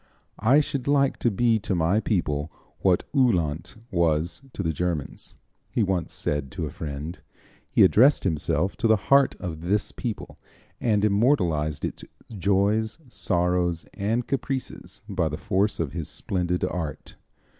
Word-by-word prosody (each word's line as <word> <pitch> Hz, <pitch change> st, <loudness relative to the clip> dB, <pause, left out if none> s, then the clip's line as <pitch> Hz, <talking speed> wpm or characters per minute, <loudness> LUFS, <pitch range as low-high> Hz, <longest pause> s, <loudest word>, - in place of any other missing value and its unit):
"I 130 Hz, +8 st, +5 dB
should 140 Hz, -3 st, -3 dB
like 140 Hz, -1 st, +3 dB
to 120 Hz, -, +1 dB
be 115 Hz, +2 st, +2 dB
to 100 Hz, -2 st, -2 dB
my 85 Hz, +5 st, +2 dB
people 80 Hz, -8 st, -1 dB, 0.3 s
what 90 Hz, -2 st, +3 dB
Uhland 90 Hz, -, +1 dB, 0.2 s
was 85 Hz, 0 st, +1 dB
to 100 Hz, -, -3 dB
the 80 Hz, -1 st, 0 dB
Germans," 85 Hz, -3 st, -3 dB, 0.3 s
he 115 Hz, -, +1 dB
once 95 Hz, -5 st, -1 dB
said 75 Hz, -2 st, -2 dB
to -, -, -3 dB
a -, -, -5 dB
friend. 75 Hz, +3 st, -6 dB, 0.5 s
He -, -, +5 dB
addressed 135 Hz, +6 st, +5 dB
himself 85 Hz, +1 st, 0 dB
to 115 Hz, -, +1 dB
the 110 Hz, -, +6 dB
heart 140 Hz, +6 st, +3 dB
of 80 Hz, -4 st, -5 dB
this 100 Hz, +4 st, 0 dB
people 115 Hz, -4 st, -6 dB, 0.4 s
and 105 Hz, -3 st, +2 dB
immortalized 90 Hz, -, +2 dB
its -, -, -6 dB, 0.3 s
joys, 100 Hz, +3 st, +1 dB
sorrows 90 Hz, -5 st, 0 dB
and 115 Hz, +5 st, -1 dB
caprices 135 Hz, -1 st, -4 dB
by -, -, 0 dB
the -, -, -4 dB
force 100 Hz, +3 st, 0 dB
of 80 Hz, -5 st, -1 dB
his 85 Hz, -3 st, -4 dB
splendid 90 Hz, -1 st, -2 dB
art. 80 Hz, -5 st, -4 dB
95 Hz, 145 wpm, -25 LUFS, 85-110 Hz, 0.5 s, the